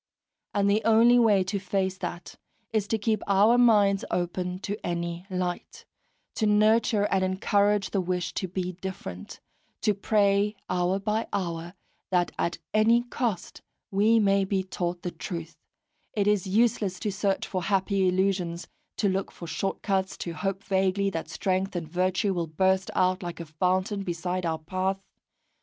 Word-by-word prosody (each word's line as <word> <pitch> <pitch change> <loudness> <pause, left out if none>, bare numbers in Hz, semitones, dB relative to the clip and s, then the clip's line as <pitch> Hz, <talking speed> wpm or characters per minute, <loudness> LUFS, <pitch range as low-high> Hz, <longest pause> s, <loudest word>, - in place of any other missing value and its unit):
And 200 -1 +2
the 205 +2 +3
only 230 +2 +6
way 210 -5 +4
to 200 +2 -2
face 190 0 -1
that 175 - -6 0.4
is 210 -2 +1
to 225 - 0
keep 215 0 0
our 200 +4 +5
minds 205 -5 +4
open 180 +1 -2
to 205 +2 -5
any 170 +1 -3
light, 185 - -4 0.5
to 215 - 0
nurture 215 0 +3
and 190 -1 +2
encourage 200 +2 +1
the 195 - +1
wish 180 0 -2
to 190 - -2
be 185 0 -3
different, 175 - -7 0.4
to 210 - +2
pray 205 0 +2
hour 180 +1 +1
by 210 +3 -1
hour 170 -1 -3 0.3
that 180 -2 +1
at 170 - 0 0.2
any 225 +3 +4
cost 235 -6 -3 0.3
we 215 +4 +4
may 200 -2 +3
be 190 0 0
taught 175 -2 -4
the 180 - -3
truth; 170 -4 -6 0.6
it 205 -2 +1
is 205 -2 +2
useless 205 -2 +1
to 210 - -1
search 195 0 -1
for 185 - -3
happy 195 0 +1
illusions, 180 -2 0 0.3
to 205 - +2
look 195 0 -1
for 170 - -9
short 165 +4 -3
cuts, 190 -1 0
to 170 - -5
hope 195 +3 -3
vaguely 195 +1 +1
that 165 -3 -4
strength 190 0 -1
and 170 -2 -3
virtue 185 +4 0
will 170 -2 -2
burst 190 +4 +1
out 185 +1 +2
like 175 -2 -6
a 170 - -5
fountain 185 +5 0
beside 180 0 -2
our 160 -1 -1
path. 185 +4 -2
190 Hz, 160 wpm, -27 LUFS, 180-205 Hz, 0.6 s, only